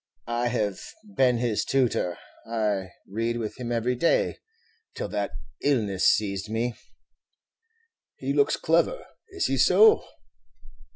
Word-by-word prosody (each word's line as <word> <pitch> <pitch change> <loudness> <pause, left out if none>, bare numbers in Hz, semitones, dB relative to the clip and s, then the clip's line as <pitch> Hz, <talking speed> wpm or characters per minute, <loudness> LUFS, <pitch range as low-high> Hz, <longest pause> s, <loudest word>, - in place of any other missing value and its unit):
I 120 +1 -1
have 105 -5 -1 0.4
been 125 -2 +4
his 115 -3 0
tutor; 125 -9 0 0.3
I 105 -4 -1 0.2
read 115 +3 -2
with 115 +1 -5
him 120 -1 -4
every 120 +1 0
day, 145 +7 +1 0.6
till - - -3
that 100 -1 -2 0.3
illness 105 -10 +1
seized 100 -1 0
me." 115 +2 -1 1.4
"He - - -3
looks 425 - +3
clever; - - +1 0.2
is 390 0 -2
he 135 - 0
so?" 200 - +6
115 Hz, 120 wpm, -26 LUFS, 105-125 Hz, 1.4 s, so